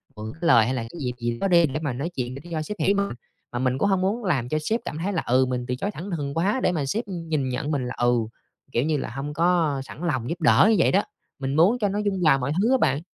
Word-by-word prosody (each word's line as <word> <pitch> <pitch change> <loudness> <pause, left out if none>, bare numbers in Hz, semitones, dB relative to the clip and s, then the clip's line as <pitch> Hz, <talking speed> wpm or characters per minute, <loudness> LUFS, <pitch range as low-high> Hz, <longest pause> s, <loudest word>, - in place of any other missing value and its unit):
mượn 110 0 -6
cái 160 - -19
lời 115 -9 +6
hay 125 - -1
là 125 - -2
cái 115 +9 -8
dịp 125 -2 -1
gì 120 0 -2
đó - - +1
đi 170 -2 +5
để 150 +1 -3
mà 140 -5 -1
nói 140 +7 -3
chuyện 125 0 -3
để 135 - -8
cho 160 -2 -1
sếp 210 +7 -5
hiểu 200 - +3
mình, 200 0 0 0.4
mà 120 - -3
mình 130 0 +1
cũng 200 - +1
hông 190 -2 +2
muốn 205 +6 0
làm 135 - 0
cho 155 - 0
sếp 220 +9 0
cảm 150 - -4
thấy 185 +5 -2
là, 165 - 0
ừ, 130 +2 +3
mình 125 -1 -3
từ 125 - -1
chối 195 +11 -3
thẳng 180 +2 -7
thừng 145 -4 -3
quá 195 - +1
để - - +3
mà 155 -5 -1
sếp 215 - -1
nhìn 160 -7 -2
nhận 135 +4 -2
mình 130 -4 -1
là, 125 - -4
ừ, 120 0 +3 0.6
kiểu 120 - +1
như 155 0 +1
là, - - -4
hông 135 +5 -5
có 165 -4 +2
sẵn 155 - -10
lòng 130 -7 -1
giúp 170 +1 -4
đỡ 175 +5 +6
như 225 - +4
vậy - - +4
đó, 200 - +3 0.4
mình 135 +1 -2
muốn 195 +10 +4
cho 205 -3 +1
nó 205 +2 -2
dung 200 -3 -1
hòa 150 -4 +5
mọi 135 +1 -2
thứ 230 - +2
á 265 - +5
bạn. 140 - +1
155 Hz, 305 wpm, -24 LUFS, 130-185 Hz, 0.6 s, lời